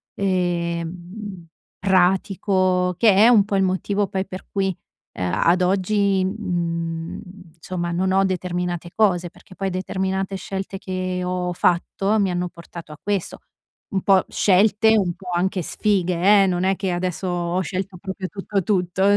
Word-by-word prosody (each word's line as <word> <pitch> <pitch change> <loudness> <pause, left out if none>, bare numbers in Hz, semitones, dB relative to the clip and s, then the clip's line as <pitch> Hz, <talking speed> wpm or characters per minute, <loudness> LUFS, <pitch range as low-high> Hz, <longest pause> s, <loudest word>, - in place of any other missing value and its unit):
ehm, 175 +1 -2 0.3
pratico, 185 -1 +2
che 215 -4 +5
è 215 +4 +7
un 215 -5 +6
po' 205 - -2
il 195 - +3
motivo 195 +2 0
poi 190 0 -3
per 185 0 -8
cui, 195 -2 0 0.4
ehm, 90 -1 -1
ad 170 - +3
oggi, 195 +1 +2
mhmm, 170 -5 -3 0.4
insomma 175 +1 -4
non 185 +2 0
ho 195 +1 +3
determinate 180 -2 -2
cose, 180 -5 +2
perché 185 - -17
poi 195 0 -2
determinate 190 +1 -2
scelte 195 +1 -5
che 185 -1 -3
ho 180 0 -2
fatto 195 +4 +1
mi 195 -2 +1
hanno 180 0 -2
portato 170 -1 -11
a 150 - -11
questo. 200 -3 -2 0.5
Un 190 - 0
po' 195 -1 +5
scelte, 210 +3 +4
un 185 -4 +1
po' 185 0 -10
anche 185 +1 0
sfighe 195 +1 +3
eh, - - +3
non 180 -1 0
è 190 +1 +2
che 190 -1 -2
adesso 180 +1 -2
ho 175 0 -1
scelto 185 +1 -4
proprio 190 +1 -5
tutto 195 +1 -2
tutto. 185 -1 0
185 Hz, 155 wpm, -22 LUFS, 175-195 Hz, 0.5 s, è